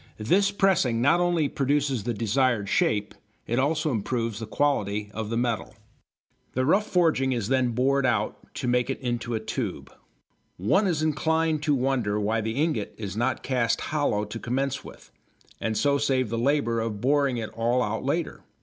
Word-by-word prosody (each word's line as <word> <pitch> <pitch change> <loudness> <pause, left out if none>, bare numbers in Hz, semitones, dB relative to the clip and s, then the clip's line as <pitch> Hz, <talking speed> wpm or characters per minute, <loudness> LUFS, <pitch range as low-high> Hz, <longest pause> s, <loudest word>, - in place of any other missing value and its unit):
This 185 - +2
pressing 190 - +2
not 140 +8 +4
only 175 -4 +2
produces 140 -5 0
the 120 - 0
desired 115 -1 +1
shape, 105 +1 +1 0.3
it 120 +2 0
also 155 +3 +1
improves 115 -1 -2
the 110 - -6
quality 105 -6 0
of 110 -1 -4
the 115 - -1
metal. 120 -3 -2 0.8
The 130 +1 0
rough 200 +8 +3
forging 160 -8 +2
is 115 -3 -2
then 130 -3 +2
bored 135 +3 +2
out, 120 -5 -1
to - - -3
make 125 +1 +1
it 135 - -2
into 120 -2 -2
a - - -1
tube. 110 - -4 0.7
One 190 - +2
is 160 -4 0
inclined 160 0 +1
to 150 -1 +2
wonder 125 -6 0
why 110 +2 0
the 110 +1 -3
ingot 145 -7 -1
is 100 -3 -5
not 120 +3 -1
cast 125 -3 +1
hollow 145 -9 0
to 110 +2 -7
commence 135 +4 -2
with, - - -13 0.5
and 110 -1 -1
so 140 0 +2
save 130 -4 +1
the 115 - -2
labour 125 -3 +1
of 110 -2 -3
boring 140 +1 +2
it 110 -2 -4
all 120 +2 +1
out 110 0 -2
later. 155 +5 -2
125 Hz, 175 wpm, -26 LUFS, 115-145 Hz, 0.8 s, not